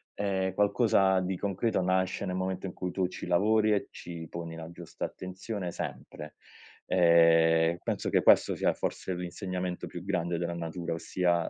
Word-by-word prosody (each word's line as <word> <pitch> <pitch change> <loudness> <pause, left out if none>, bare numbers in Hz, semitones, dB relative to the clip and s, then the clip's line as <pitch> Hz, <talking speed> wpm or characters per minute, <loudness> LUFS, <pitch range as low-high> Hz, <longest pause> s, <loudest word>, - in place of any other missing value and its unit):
ehm, 95 -2 -1
qualcosa 100 -2 +3
di 95 0 -2
concreto 100 +2 0
nasce 95 +2 0
nel 90 -1 -3
momento 95 0 -2
in 90 - -7
cui 90 -1 -4
tu 95 -1 0
ci 90 - -8
lavori 105 +4 +3
e 100 - 0
ci 85 -2 -8
poni 85 -1 -6
la 80 0 -8
giusta 85 -1 -6
attenzione, 95 0 -6
sempre. 75 -2 -7 0.5
Ehm, 85 -1 +5
penso - - -2
che - - +2
questo - - +5
sia, - - +1
forse, 95 - -3
l'insegnamento 90 0 -4
più 85 - -7
grande 90 -3 -1
della 85 0 -2
natura, 85 0 -4
ossia, 85 +1 0
90 Hz, 160 wpm, -29 LUFS, 85-95 Hz, 0.5 s, Ehm